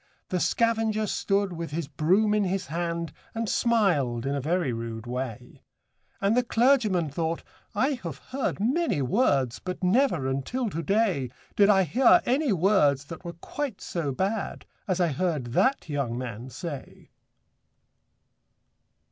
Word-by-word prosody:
The 180 - 0
scavenger 225 0 +1
stood 200 -1 0
with 170 -1 -5
his 155 0 -3
broom 185 +9 +2
in 210 -1 +2
his 190 +1 -1
hand, 170 0 -3 0.2
And 225 0 -1
smiled 170 - +2
in 140 - 0
a 140 - -1
very 160 -2 0
rude 115 0 -5
way; 125 0 -5 0.6
And 200 +3 +2
the 250 - +4
clergyman 225 - +2
thought, 165 +2 -2 0.3
'I 260 +4 +1
have 165 -6 -5
heard 260 - -3
many 230 - +1
words, 135 - +1
But 185 +1 -6
never, 185 - +2
until 200 - -2
to 165 - -3
day, 185 - +1 0.3
Did 205 0 +5
I 195 -2 +5
hear 240 - +5
any 270 +1 +2
words 160 -7 +3
that 165 +4 -9
were 170 -1 -6
quite 255 - -5
so 165 -5 -3
bad 195 +9 -2 0.2
As 185 -2 0
I 175 -2 +3
heard 145 -6 -2
that 265 - +2
young 140 -6 -2
man 120 0 -6
say.' 140 +2 -8
175 Hz, 145 wpm, -27 LUFS, 140-215 Hz, 0.6 s, Did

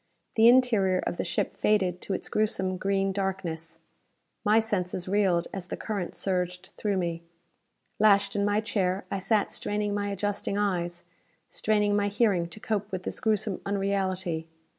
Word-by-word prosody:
The 225 +1 +6
interior 230 -7 +5
of - - -2
the - - -1
ship 175 - -1
faded 185 -4 +1
to 195 - -2
its - - -5
gruesome 190 -3 0
green 195 +1 +1
darkness. 180 -4 -3 0.7
My 215 +2 +5
senses 185 -5 -1
reeled 185 -3 +2
as 190 -2 -5
the - - -4
current 200 -5 -4
surged 180 -1 -2
through 205 -2 -1
me. 170 -2 -2 0.8
Lashed 200 -1 +4
in 200 - +1
my 205 +1 +2
chair, 195 -3 -1
I 195 - -1
sat 200 +2 +1
straining 210 0 -1
my 205 0 -1
adjusting 200 0 -2
eyes, 175 -4 -1 0.5
straining 210 -1 +1
my 205 0 +2
hearing 200 -5 +2
to 195 - -11
cope 210 -1 -2
with 185 -1 -3
this - - -4
gruesome 215 -3 0
unreality. 190 -4 -1
195 Hz, 160 wpm, -28 LUFS, 180-205 Hz, 0.8 s, The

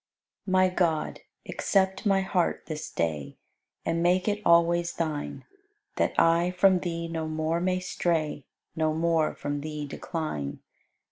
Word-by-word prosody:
94. - - -2
My 185 -1 +3
God, 160 -4 0 0.3
accept 190 +1 +1
my 195 -1 +4
heart 190 -2 0
this 155 -1 -5
day 75 -4 -2 0.5
And 165 0 0
make 180 +3 +2
it 210 0 0
always 170 0 +4
Thine, 155 -3 -3 0.5
That - - +1
I 170 +1 +4
from 185 +1 +4
Thee 170 -1 -3
no 165 -1 -3
more 155 +1 -1
may 185 0 +1
stray, 165 -5 -1 0.3
No 155 -1 +1
more 165 -1 +1
from 145 0 -3
Thee 150 0 -4
decline. 140 - -4
165 Hz, 140 wpm, -27 LUFS, 155-180 Hz, 0.5 s, my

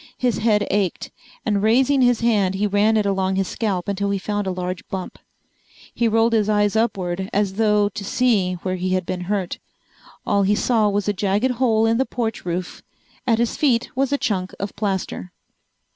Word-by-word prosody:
His 245 -3 0
head 210 -2 +2
ached, 200 -4 -1 0.3
and 205 -3 +1
raising 260 +6 +3
his 245 -2 +3
hand 205 -5 +2
he 200 +2 0
ran 210 +2 +3
it 210 - +1
along 190 -1 0
his 195 -1 0
scalp 195 -6 -2
until 200 0 -1
he 200 - 0
found 205 +1 -3
a - - 0
large 180 0 -4
bump. 190 -1 -6 0.7
He 235 - +1
rolled 225 +1 +2
his 215 -2 +2
eyes 205 0 +2
upward 190 -4 -1
as 200 -1 0
though 210 -1 +2
to 205 - -7
see 200 -4 +1
where 185 0 -2
he 185 +1 0
had 185 -1 -1
been 180 0 -4
hurt. 195 -2 -2 0.7
All 200 - +2
he 200 +1 +3
saw 220 -1 +2
was 205 0 -1
a 205 - +2
jagged 205 +6 +1
hole 225 -3 +2
in 225 +1 +2
the 265 - +1
porch 225 -5 -3
roof. 180 +1 -4 0.5
At 230 -2 +3
his 235 0 0
feet 245 -6 +1
was 270 +1 0
a 285 - +2
chunk 185 -7 -2
of 200 +1 -5
plaster. 195 -3 -3
205 Hz, 195 wpm, -21 LUFS, 190-225 Hz, 0.7 s, raising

